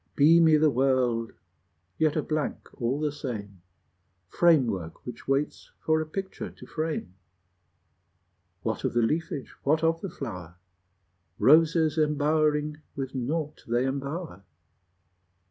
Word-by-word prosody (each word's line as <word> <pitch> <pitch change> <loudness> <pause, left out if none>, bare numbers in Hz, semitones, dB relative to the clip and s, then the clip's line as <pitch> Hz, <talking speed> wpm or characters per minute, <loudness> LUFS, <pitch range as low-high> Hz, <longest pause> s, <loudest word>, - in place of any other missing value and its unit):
Beamy 160 +1 +6
the 155 0 +4
world, 125 -3 +1 0.7
yet 155 -2 +2
a 155 - 0
blank 155 -1 -3
all 125 +4 0
the 150 -1 0
same, 105 -10 -6 0.7
Framework 120 - +2
which 120 -1 -9
waits 135 +2 -1
for 155 0 +1
a 155 - -4
picture 190 +4 -5
to - - -14
frame: 155 - -3 1.5
What - - -2
of - - -1
the 120 -1 +2
leafage, 150 +2 -2
what 155 +3 +1
of 165 0 +2
the 195 - -4
flower? 90 - -7 0.8
Roses 160 +1 +4
embowering 150 0 +1 0.2
with 135 -1 -4
naught 150 +4 -3
they 120 +2 +1
embower! 140 - -4
150 Hz, 120 wpm, -27 LUFS, 125-155 Hz, 1.5 s, Beamy